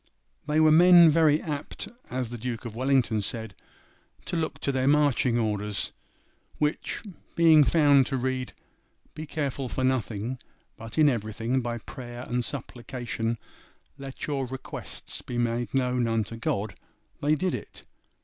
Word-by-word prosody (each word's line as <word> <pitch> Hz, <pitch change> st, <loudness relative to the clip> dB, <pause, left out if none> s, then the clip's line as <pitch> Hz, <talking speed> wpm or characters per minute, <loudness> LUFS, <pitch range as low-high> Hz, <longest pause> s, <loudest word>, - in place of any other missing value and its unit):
They 150 Hz, +1 st, +2 dB
were 155 Hz, 0 st, +6 dB
men 170 Hz, 0 st, +8 dB
very 155 Hz, -1 st, +4 dB
apt, 145 Hz, -3 st, -5 dB, 0.2 s
as 125 Hz, -2 st, -3 dB
the 120 Hz, -, -6 dB
Duke 120 Hz, +1 st, -4 dB
of 115 Hz, -2 st, -6 dB
Wellington 130 Hz, -4 st, +2 dB
said, 110 Hz, 0 st, -4 dB, 0.7 s
to -, -, -3 dB
'look 160 Hz, -1 st, -2 dB
to 140 Hz, -, 0 dB
their 130 Hz, 0 st, 0 dB
marching 145 Hz, -4 st, +3 dB
orders;' 105 Hz, -2 st, -1 dB, 0.6 s
which, 150 Hz, 0 st, -1 dB, 0.3 s
being 160 Hz, -3 st, +7 dB
found 145 Hz, -3 st, +4 dB
to 135 Hz, -, -1 dB
read, 130 Hz, 0 st, -2 dB, 0.6 s
'be 155 Hz, 0 st, -7 dB
careful 140 Hz, -4 st, -3 dB
for 130 Hz, -, -2 dB
nothing, 125 Hz, -1 st, -1 dB, 0.4 s
but 115 Hz, +3 st, -9 dB
in 155 Hz, -1 st, +6 dB
everything 115 Hz, +1 st, 0 dB
by 120 Hz, -1 st, -3 dB
prayer 120 Hz, +1 st, -8 dB
and 120 Hz, 0 st, -1 dB
supplication 120 Hz, -3 st, -4 dB, 0.6 s
let 135 Hz, -1 st, -6 dB
your 140 Hz, -3 st, -2 dB
requests 130 Hz, +1 st, -5 dB
be 120 Hz, -, -6 dB
made 120 Hz, 0 st, -1 dB
known 125 Hz, -2 st, +1 dB
unto 115 Hz, -1 st, -1 dB
God,' 105 Hz, -2 st, -2 dB, 0.5 s
they 150 Hz, +2 st, +3 dB
did 180 Hz, +4 st, -1 dB
it. -, -, -7 dB
130 Hz, 145 wpm, -27 LUFS, 115-145 Hz, 0.7 s, men